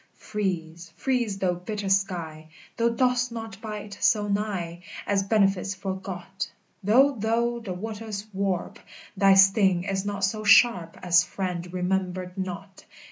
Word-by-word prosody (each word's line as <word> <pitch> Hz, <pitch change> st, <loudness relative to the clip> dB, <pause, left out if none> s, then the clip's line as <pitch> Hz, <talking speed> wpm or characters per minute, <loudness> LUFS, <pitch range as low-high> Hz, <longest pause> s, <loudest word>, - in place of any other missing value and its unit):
Freeze, 175 Hz, -5 st, -4 dB
freeze, 240 Hz, -7 st, 0 dB
thou 185 Hz, -2 st, +1 dB
bitter 200 Hz, +3 st, -5 dB
sky, 170 Hz, -5 st, -1 dB, 0.3 s
Thou 235 Hz, 0 st, +2 dB
dost 250 Hz, +1 st, +1 dB
not 225 Hz, -3 st, -7 dB
bite 210 Hz, -2 st, -7 dB
so 210 Hz, -2 st, +3 dB
nigh 195 Hz, -5 st, -2 dB, 0.2 s
As 200 Hz, -1 st, +1 dB
benefits 195 Hz, -2 st, +1 dB
forgot: 190 Hz, 0 st, -5 dB, 0.3 s
Though 260 Hz, +8 st, +5 dB
thou 235 Hz, +2 st, 0 dB
the 210 Hz, -5 st, -5 dB
waters 215 Hz, +1 st, -5 dB
warp, 195 Hz, -2 st, -2 dB, 0.4 s
Thy 195 Hz, 0 st, +5 dB
sting 195 Hz, -2 st, +5 dB
is 195 Hz, 0 st, -2 dB
not 200 Hz, -1 st, -3 dB
so 215 Hz, +2 st, 0 dB
sharp 200 Hz, -5 st, +5 dB
As 175 Hz, 0 st, +5 dB
friend 180 Hz, -2 st, -4 dB
remembered 185 Hz, 0 st, -2 dB
not. 190 Hz, 0 st, -6 dB
195 Hz, 135 wpm, -26 LUFS, 180-215 Hz, 0.4 s, Though